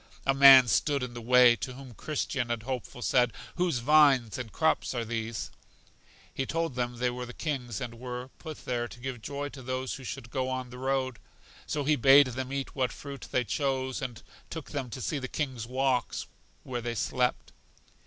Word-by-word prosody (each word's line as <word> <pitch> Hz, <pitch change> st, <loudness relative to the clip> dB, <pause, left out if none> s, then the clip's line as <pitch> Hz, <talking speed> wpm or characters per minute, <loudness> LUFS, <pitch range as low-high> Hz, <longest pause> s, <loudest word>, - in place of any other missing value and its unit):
A 135 Hz, -, +4 dB
man 135 Hz, -2 st, +9 dB
stood 140 Hz, +3 st, +2 dB
in 125 Hz, -1 st, -5 dB
the 120 Hz, -, -7 dB
way, 125 Hz, 0 st, +6 dB
to 130 Hz, -, -5 dB
whom 130 Hz, -1 st, -11 dB
Christian 135 Hz, -2 st, -2 dB
and 115 Hz, -2 st, -2 dB
Hopeful 125 Hz, -1 st, -5 dB
said: 120 Hz, +3 st, +3 dB, 0.3 s
Whose 175 Hz, -6 st, +1 dB
vines 135 Hz, -3 st, +4 dB
and 120 Hz, -4 st, -6 dB
crops 160 Hz, -4 st, +1 dB
are 120 Hz, -1 st, -1 dB
these? 115 Hz, -1 st, -4 dB, 0.8 s
He 135 Hz, -, -2 dB
told 165 Hz, -3 st, -1 dB
them 120 Hz, 0 st, -2 dB
they 125 Hz, +1 st, +1 dB
were 125 Hz, 0 st, -5 dB
the 125 Hz, -, -10 dB
king's 125 Hz, -, -3 dB
and 115 Hz, -1 st, -6 dB
were 125 Hz, +1 st, -6 dB
put 155 Hz, -3 st, -9 dB
there 120 Hz, -1 st, -1 dB
to 120 Hz, -, -12 dB
give 125 Hz, -2 st, -5 dB
joy 145 Hz, +4 st, -4 dB
to 140 Hz, -, -10 dB
those 130 Hz, +1 st, -3 dB
who 135 Hz, -, -8 dB
should 120 Hz, -1 st, -7 dB
go 130 Hz, +1 st, -1 dB
on 130 Hz, -1 st, -4 dB
the 125 Hz, -, -9 dB
road. 130 Hz, -2 st, -1 dB, 0.5 s
So 145 Hz, -, -1 dB
he 150 Hz, +2 st, +3 dB
bade 135 Hz, +3 st, +8 dB
them 130 Hz, +1 st, -4 dB
eat 140 Hz, -1 st, -3 dB
what 130 Hz, -3 st, 0 dB
fruit 140 Hz, -2 st, -8 dB
they 125 Hz, -, +2 dB
chose, 130 Hz, +2 st, -1 dB
and 120 Hz, -3 st, -5 dB, 0.3 s
took 160 Hz, -3 st, -7 dB
them 135 Hz, -4 st, -3 dB
to 130 Hz, -, -6 dB
see 145 Hz, +4 st, -1 dB
the 130 Hz, -, -4 dB
king's 130 Hz, -6 st, -3 dB
walks; 130 Hz, -1 st, 0 dB, 0.4 s
where 125 Hz, -2 st, -4 dB
they 120 Hz, 0 st, -3 dB
slept. 125 Hz, +4 st, -1 dB
130 Hz, 200 wpm, -29 LUFS, 120-135 Hz, 0.8 s, man